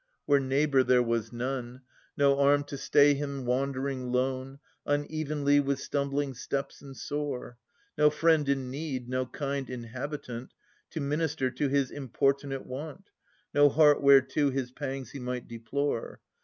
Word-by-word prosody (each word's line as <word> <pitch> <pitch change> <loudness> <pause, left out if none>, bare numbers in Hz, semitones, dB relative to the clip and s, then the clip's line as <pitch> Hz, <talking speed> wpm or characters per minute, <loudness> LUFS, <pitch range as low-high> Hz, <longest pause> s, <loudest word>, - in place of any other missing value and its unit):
Where 145 -1 +4
neighbour 135 +1 +2
there 125 -1 +4
was 115 -2 -1
none: 125 +1 -4 0.4
No 140 -1 +4
arm 145 +1 +4
to 145 - -7
stay 145 +1 +5
him 140 -2 -4
wandering 130 0 -1
lone, 130 +1 -1 0.3
Unevenly, 145 -1 +1
with 140 -1 0
stumbling 140 -1 -1
steps 135 +2 -4
and 135 -2 -11
sore; 140 -5 -4 0.4
No 150 0 +7
friend 155 -1 +2
in 135 -2 0
need, 135 -3 -4
no 130 0 -1
kind 140 +1 -3
inhabitant, 125 +1 -6 0.3
To 160 - -5
minister 145 -2 -1
to 140 +3 -1
his 140 -1 +1
importunate 135 0 -1
want. 155 +8 -8 0.4
No 145 0 +6
heart 150 0 +5
whereto 140 +1 +5
his 130 -2 -3
pangs 135 -2 -5
he 140 - -7
might 125 -1 -4
deplore. 115 +3 -3
140 Hz, 140 wpm, -29 LUFS, 130-145 Hz, 0.4 s, No